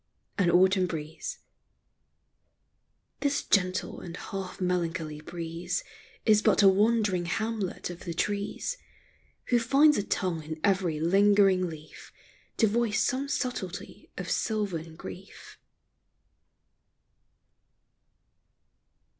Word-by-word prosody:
AN 180 -3 +4
AUTUMN 185 +1 +4
BREEZE. 155 -2 -5 1.8
This 285 0 0
gentle 185 -2 +1
and 175 0 -8
half 195 -2 -6
melancholy 170 -4 -2
breeze 170 +2 -4 0.4
Is 215 -2 +5
but 210 - +4
a - - +8
wandering 205 -2 +3
Hamlet 215 -1 -2
of 175 - -10
the 170 - -4
trees, 205 - -2 0.7
Who 245 - +4
finds 275 +5 +4
a - - -1
tongue 180 -5 -1
in 155 +1 -7
every 185 -6 +1
lingering 195 +1 +4
leaf 155 -1 -11 0.5
To 225 - +5
voice 220 0 +1
some 260 +3 0
subtlety 245 -9 -4
of - - -5
sylvan 180 -7 -2
grief. 185 +3 -11
190 Hz, 100 wpm, -28 LUFS, 170-215 Hz, 1.8 s, a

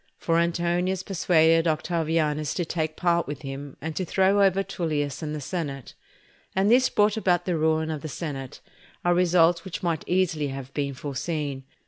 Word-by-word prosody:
For 165 0 +1
Antonius 175 +2 0
persuaded 165 -3 +3
Octavianus 155 -2 0
to 175 - -1
take 160 -1 -2
part 170 -1 +1
with 145 0 -6
him, 135 0 -7
and 160 +2 -5
to 185 - -1
throw 190 +3 +3
over 195 0 +3
Tullius 150 -6 -2
and 155 -1 -3
the - - -4
senate. 140 -4 -5 0.6
And 195 +3 +3
this 255 +2 +5
brought 210 +1 +2
about 175 -4 +1
the 180 - 0
ruin 160 0 +1
of 155 -2 -4
the 155 - -5
senate, 135 -4 -6 0.4
a 175 - +4
result 175 -1 +3
which 190 - -6
might 165 -3 -1
easily 175 -5 +1
have 135 -1 -7
been 140 -2 -2
foreseen. 140 0 -4
165 Hz, 170 wpm, -25 LUFS, 150-180 Hz, 0.6 s, this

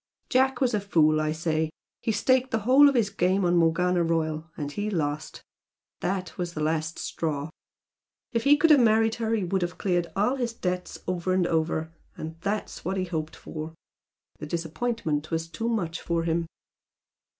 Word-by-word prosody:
Jack 265 0 +2
was 250 -3 +2
a 210 - +2
fool, 155 -6 +3
I 155 0 0
say 160 0 0 0.3
he 225 - 0
staked 255 +4 +2
the 225 -2 -1
whole 265 +6 +7
of 280 - -1
his 215 -5 +2
game 185 +2 +1
on 175 0 +3
Morgana 175 +1 +3
Royal, 160 -1 -1
and 145 -2 -4
he 205 +7 -2
lost. 155 -5 -3 0.6
That 185 0 -3
was 175 -1 -3
the - - -3
last 160 +1 -1
straw. 150 -2 -3 0.8
If 230 -1 0
he 290 +1 +6
could 325 +1 +4
have 295 - +8
married 225 -1 +4
her 225 0 +1
he 210 - -1
would 185 +1 0
have 175 0 -2
cleared 175 -3 0
all 215 +7 +2
his 240 -3 -2
debts 180 -4 -3
over 185 0 0
and 185 -1 +2
over 160 -1 0 0.2
and 160 +1 -6
that's 205 +3 -3
what 190 +2 -2
he 185 - 0
had 180 - -8
hoped 155 -1 -3
for. 160 +1 -7 0.6
The 150 - -6
disappointment 165 -1 -2
was 165 0 -2
too 225 +7 -3
much 175 -8 -2
for 170 -1 -1
him." 165 0 0
175 Hz, 185 wpm, -27 LUFS, 160-220 Hz, 0.8 s, have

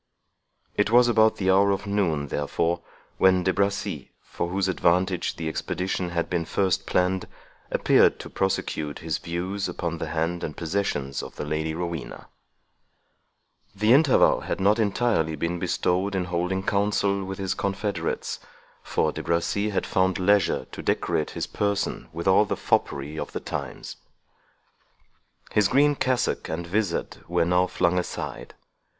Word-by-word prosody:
It 105 0 +2
was 120 +2 +6
about 110 -2 +4
the 95 -1 +1
hour 100 +1 +5
of 100 0 -1
noon, 85 -8 0
therefore, 85 +5 -1 0.4
when 95 -1 +5
De 95 +1 +2
Bracy, 100 0 -1
for 85 - -4
whose 95 +1 0
advantage 90 0 +1
the 80 - -4
expedition 90 +2 -2
had 85 -1 -1
been 85 -2 -1
first 95 +2 0
planned, 90 0 +1 0.4
appeared - - +4
to - - -8
prosecute 80 -6 -1
his 80 -3 -1
views 95 +4 -3
upon 85 -2 -3
the - - -3
hand 85 +2 -2
and 75 - -5
possessions 80 -6 -2
of - - -9
the - - -5
Lady 80 +1 -2
Rowena. 85 -3 -5 1.5
The 105 +4 +4
interval 140 -1 +5
had - - -4
not 105 +4 +3
entirely 100 -7 +1
been 85 +3 -2
bestowed 95 +4 0
in 90 -1 0
holding 90 +2 -1
council 100 0 +1
with 95 0 -5
his 95 -2 -1
confederates, 100 -3 -2 0.4
for - - 0
De - - -5
Bracy 85 +5 0
had 100 - -1
found 95 -1 +1
leisure 100 -1 +2
to - - -7
decorate 75 - 0
his - - -1
person 100 -1 -2
with 85 +3 -5
all 95 +3 +5
the - - -2
foppery 75 +3 -1
of - - -5
the - - -2
times. - - -6 1.5
His 105 -2 +4
green 145 +5 +4
cassock 130 -3 0
and 85 +2 -3
vizard 100 0 -1
were 85 0 +1
now 90 +1 +3
flung 90 0 +1
aside. 90 - -6
95 Hz, 150 wpm, -25 LUFS, 85-100 Hz, 1.5 s, was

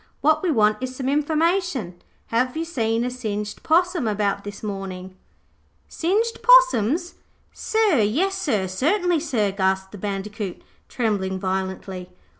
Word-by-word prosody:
What 310 +1 +3
we 370 - 0
want 215 -6 +3
is 255 0 -4
some 260 0 -4
information. 300 - 0 0.3
Have 250 +5 +1
you 325 - -1
seen 230 -7 0
a 250 - -2
singed 210 -4 -4
possum 345 -4 +2
about 200 -1 0
this 205 +1 -8
morning?' 190 -2 -6 0.7
'Singed 425 +7 0
possums, 360 - +5 0.4
sir, 435 - +2
yes 285 - +1
sir, 220 - 0
certainly 340 - +1
sir,' 240 -10 0
gasped 190 0 0
the 205 - -10
Bandicoot, 205 0 -5 0.3
trembling 195 -5 -1
violently. 190 -1 -4
230 Hz, 130 wpm, -23 LUFS, 200-325 Hz, 0.7 s, possums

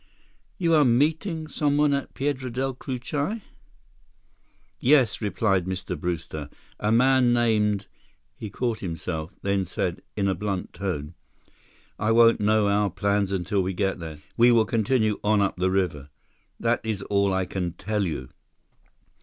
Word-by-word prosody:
"You 170 -2 +1
are 155 -2 +6
meeting 155 - +1
someone 145 -1 +2
at 140 - -3
Piedra 135 -2 -2
Del 130 +2 -1
Cucuy?" 145 - -3 1.4
"Yes," 130 -5 +3
replied 95 -2 +1
Mr. 95 0 -3
Brewster. 80 -4 -4 0.3
"A 105 - 0
man 125 +1 +4
named—" 105 -4 +2 0.5
He 110 - -7
caught 115 +2 -2
himself, 80 -2 -4
then 100 -1 +1
said 90 0 -3 0.2
in 100 -1 +1
a 95 - +2
blunt 95 0 -4
tone: 90 -6 -4 0.9
"I 105 - +1
won't 115 0 +6
know 105 0 +3
our 100 0 +2
plans 100 +1 0
until 95 +1 0
we 95 +1 -2
get 95 0 -1
there. 80 -3 -7 0.2
We 120 +1 +6
will 115 -2 +4
continue 110 -1 +1
on 105 0 +3
up 100 -2 0
the 90 +1 +1
river. 85 -7 -1 0.5
That 115 +1 +1
is 110 -3 -3
all 100 0 +1
that 95 - 0
I 95 0 0
can 90 -2 -3
tell 105 +3 -2
you." 75 -8 -4
105 Hz, 150 wpm, -25 LUFS, 95-120 Hz, 1.4 s, are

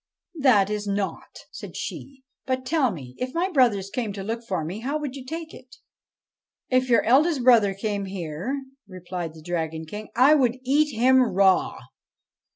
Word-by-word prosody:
' - - -65 0.2
That 205 -4 +4
is 210 -1 -3
nought,' 200 0 -4
said - - -9
she. 270 -1 -7
' - - -66
But, 260 0 -1
tell 280 -2 +2
me; 135 - -8
if 255 +3 -4
my 365 +3 0
brothers 220 - +2
came 230 -5 -2
to 195 -1 -6
look 230 +3 -4
for 185 -8 -3
me, 180 +7 -5
how 275 +6 -2
would 290 -3 -5
you 270 - -8
take 320 +4 -7
it? 255 -1 -14 0.3
' - - -70
' - - -64
If 255 0 +2
your 235 -3 +4
eldest 275 +3 +3
brother 225 -6 +5
came 200 0 -3
here,' 190 - -4 0.3
replied 180 -3 -6
the 160 - -13
Dragon 160 -2 -3
King, 210 +6 -8
' - - -40
I 260 +5 +6
would 255 -4 +2
eat 290 +1 +2
him 260 +3 +5
raw. 195 -5 +2
230 Hz, 195 wpm, -24 LUFS, 190-260 Hz, 0.3 s, I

